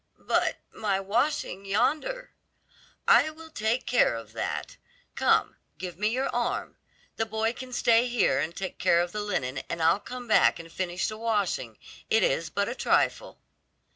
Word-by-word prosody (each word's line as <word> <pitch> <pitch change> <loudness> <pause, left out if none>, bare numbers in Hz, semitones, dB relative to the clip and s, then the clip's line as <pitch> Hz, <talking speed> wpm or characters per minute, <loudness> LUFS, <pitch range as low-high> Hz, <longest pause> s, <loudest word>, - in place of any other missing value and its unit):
"But - - 0 0.2
my 200 -3 0
washing 210 0 -1
yonder?" 305 - 0 0.8
"I - - +6
will 320 +1 -12
take 220 +1 -1
care 245 - +3
of 115 -1 -9
that. - - -4 0.4
Come, - - +2 0.2
give 180 -1 -7
me 210 - +2
your 255 +5 0
arm. 240 0 -2 0.4
The 225 - 0
boy 220 +1 0
can 255 0 -9
stay 235 0 +3
here 240 - +2
and 160 +4 -2
take 190 -1 -5
care 170 - +4
of 175 0 -2
the 210 - -3
linen, 140 -11 -2
and 170 - -3
I'll 165 +4 +4
come 245 +3 -8
back 215 - +5
and 165 0 -10
finish 180 -1 -2
the 215 0 -6
washing; 205 - -1 0.3
it 220 - +4
is 165 0 +1
but 200 +3 -1
a 240 - -2
trifle." - - 0
215 Hz, 170 wpm, -27 LUFS, 175-240 Hz, 0.8 s, I